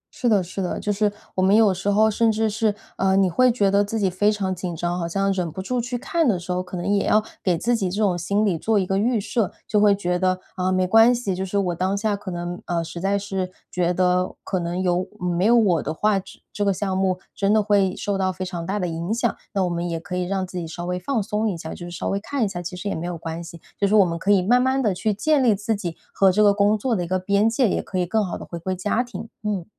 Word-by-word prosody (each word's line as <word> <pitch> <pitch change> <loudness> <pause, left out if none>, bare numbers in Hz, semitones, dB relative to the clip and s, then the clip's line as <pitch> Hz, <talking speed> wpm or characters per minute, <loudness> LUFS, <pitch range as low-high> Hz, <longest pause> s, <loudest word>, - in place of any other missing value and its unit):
是 245 - 0
的 205 -4 +3
是 185 +3 -5
的， 180 - -2
就 210 - -1
是 205 0 +1 0.2
我 185 - -1
们 190 +2 +4
有 215 -3 +5
时 185 +2 -2
候 215 +2 +4
甚 225 +1 +2
至 220 +1 +1
是 215 0 0 0.2
呃， 190 0 +2
你 190 -2 +3
会 255 +8 +4
觉 205 -5 +2
得 200 +1 +4
自 205 +2 -3
己 190 -3 +1
非 205 +3 +2
常 195 -3 -1
紧 180 -1 -5
张， 175 +2 -2
好 170 - -2
像 195 +3 0
忍 180 -4 -2
不 160 - -8
住 245 +6 -1
去 245 +1 -3
看 335 +4 0
的 205 -6 +2
时 175 +1 -6
候， 180 0 0
可 180 0 -7
能 175 +2 -4
也 200 0 +1
要 215 0 +4 0.2
给 180 -3 +2
自 240 +8 +1
己 195 -5 -1
这 200 +4 -4
种 200 -4 +2
心 200 +5 0
理 195 -4 +1
做 220 +5 +1
一 195 - +2
个 195 +1 0
预 235 +1 +2
设， 210 0 -1 0.2
就 210 - +2
会 205 -1 +5
觉 180 -2 -1
得， 185 0 +1 0.2
啊， 185 0 0
没 185 0 +2
关 225 +6 +6
系， 235 -5 -2
就 185 +1 -3
是 190 +1 -2
我 185 -3 +1
当 185 +3 0
下 210 0 0
可 200 -1 -7
能 175 0 -5
呃， 170 -1 0
实 170 +1 -7
在 195 +1 +1
是 195 -2 -3 0.2
觉 175 -1 +1
得 180 0 +1
可 190 - -2
能 175 +1 -3
有 180 0 +1 0.2
嗯， 180 -1 -1
没 180 +3 +1
有 235 - +5
我 190 -9 +3
的 155 - -3
话， 205 +5 +1
这 190 - -13
这 205 - -1
个 200 - +3
项 190 0 -2
目 190 -1 +1 0.2
真 200 0 +1
的 215 0 +4
会 200 -3 +2
受 205 - -2
到 190 -1 0
非 185 0 -5
常 175 -2 -5
大 195 +2 -1
的 180 -3 -1
影 170 +4 -4
响， 235 -1 0 0.2
那 195 -2 +1
我 180 - 0
们 175 0 -2
也 165 -1 -2
可 180 +2 -6
以 180 0 -1
让 190 0 -1
自 180 0 -6
己 165 - -5
稍 175 +2 -6
微 180 0 -2
放 230 +2 -1
松 215 +1 -1
一 180 - -3
下， 160 0 -7
就 175 - -8
是 - - -8
稍 170 - -3
微 195 - 0
看 245 +3 -1
一 - - 0
下， 175 -2 -5
其 175 +1 -6
实 180 +3 -6
也 - - -1
没 165 +2 -4
有 175 -1 -4
关 165 +1 -6
系。 170 0 -10 0.2
就 200 - +3
是 210 - +2
我 205 -3 +7
们 170 -1 -3
可 195 - -3
以 200 -3 +5
慢 245 +6 +4
慢 260 +1 +1
地 210 -4 +2
去 210 +4 -1
建 275 +7 +2
立 230 -4 +4
自 210 +3 -1
己 175 -5 -5 0.2
和 195 -1 +4
这 210 +3 +3
个 205 -1 +6
工 205 +1 +3
作 235 +2 0
的 180 - -1
一 - - -5
个 185 +2 +1
边 200 +4 +2
界， 235 +2 +2
也 - - 0
可 190 - -5
以 180 - +1
更 215 +5 +1
好 185 - -4
地 - - -9
回 170 - -7
归 185 +3 -3
家 205 +5 0
庭， 240 -3 -7
嗯。 205 -5 -2
195 Hz, 325 characters per minute, -23 LUFS, 180-210 Hz, 0.2 s, 我